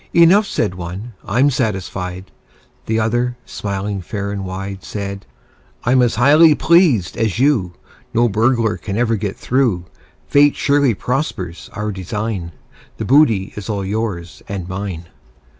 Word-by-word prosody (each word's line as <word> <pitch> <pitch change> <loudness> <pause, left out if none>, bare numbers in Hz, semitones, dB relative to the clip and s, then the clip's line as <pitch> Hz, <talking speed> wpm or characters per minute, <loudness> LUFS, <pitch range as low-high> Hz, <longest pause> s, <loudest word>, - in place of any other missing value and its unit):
"Enough," 185 +5 +6
said 105 - -1
one: 90 +6 -7
"I'm 130 +8 +2
satisfied." 95 -5 -3 0.6
The 110 0 +1
other, 120 +2 0
smiling 100 0 -4
fair 100 +2 -4
and 100 -1 -4
wide, 95 0 -6
Said: 100 -1 -6 0.6
"I'm 125 +1 +3
as 120 -2 +2
highly 150 +6 +6
pleased 155 - +3
as 110 -4 0
you: 120 -10 +2 0.4
No 120 0 +3
burglar 115 +1 +1
ever 115 +2 0
can - - -2
get 100 -2 -3
through. 120 -9 0 0.4
Fate 145 - +4
surely 140 -5 +2
prospers 95 - -3
our 105 -1 -3
design 95 -1 -4 0.5
The - - -3
booty 115 -9 +3 0.2
all 100 -2 -1
is 95 - -4
yours 100 -6 -3
and 95 -3 -4
mine." 95 -3 -5
105 Hz, 140 wpm, -18 LUFS, 95-125 Hz, 0.6 s, Enough